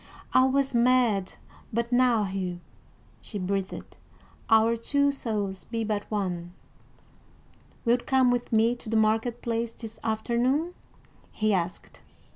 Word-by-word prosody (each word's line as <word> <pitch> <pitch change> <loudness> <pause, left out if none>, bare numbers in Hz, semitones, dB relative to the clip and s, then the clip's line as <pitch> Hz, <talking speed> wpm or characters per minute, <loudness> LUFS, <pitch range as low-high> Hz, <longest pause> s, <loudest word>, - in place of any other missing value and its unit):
"I 255 - +6
was 270 0 +1
mad 235 -5 +3 0.4
but 235 +2 -1
now, 245 -3 +4
Hugh," 185 -2 -3 0.6
she 210 - -6
breathed. 195 0 -4 0.5
"Our 225 +1 +5
two 280 +5 +1
souls 205 -8 -3
be 225 -1 -3
but 210 -1 -3
one." 180 -4 -3 1.3
"Wilt 240 +1 +2
come 260 -2 +4
with 245 0 -2
me 225 +2 +3
to 235 - -10
the 225 - +1
market 225 +2 +1
place 230 0 -2
this 225 -1 -10
afternoon?" 240 +9 0 0.6
he 215 -1 +1
asked. 175 -1 -3
225 Hz, 125 wpm, -27 LUFS, 205-245 Hz, 1.3 s, I